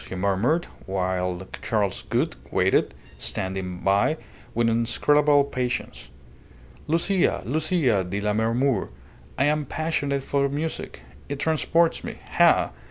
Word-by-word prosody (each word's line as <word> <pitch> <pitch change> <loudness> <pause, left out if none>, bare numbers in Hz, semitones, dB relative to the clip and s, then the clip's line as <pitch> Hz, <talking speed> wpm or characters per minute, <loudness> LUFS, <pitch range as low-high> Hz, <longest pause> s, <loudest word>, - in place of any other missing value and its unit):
he - - -5
murmured; 100 - +1 0.2
while 90 -1 -2
Charles 105 -4 0
Gould - - 0 0.2
waited, - - +2 0.2
standing 95 -1 -3
by 100 +11 +2 0.4
with 120 0 +2
inscrutable 140 +6 +3
patience. 125 - -3 0.8
"Lucia, 170 +4 +1
Lucia 145 - +1
di 95 +3 -3
Lammermoor! 110 +3 +1 0.5
I - - +3
am 150 +1 +2
passionate 145 -3 -1
for 140 0 +1
music. 155 +3 -4 0.3
It 145 - -3
transports 160 +2 +1
me. - - -6
Ha! - - +4
125 Hz, 110 wpm, -25 LUFS, 95-150 Hz, 0.8 s, Ha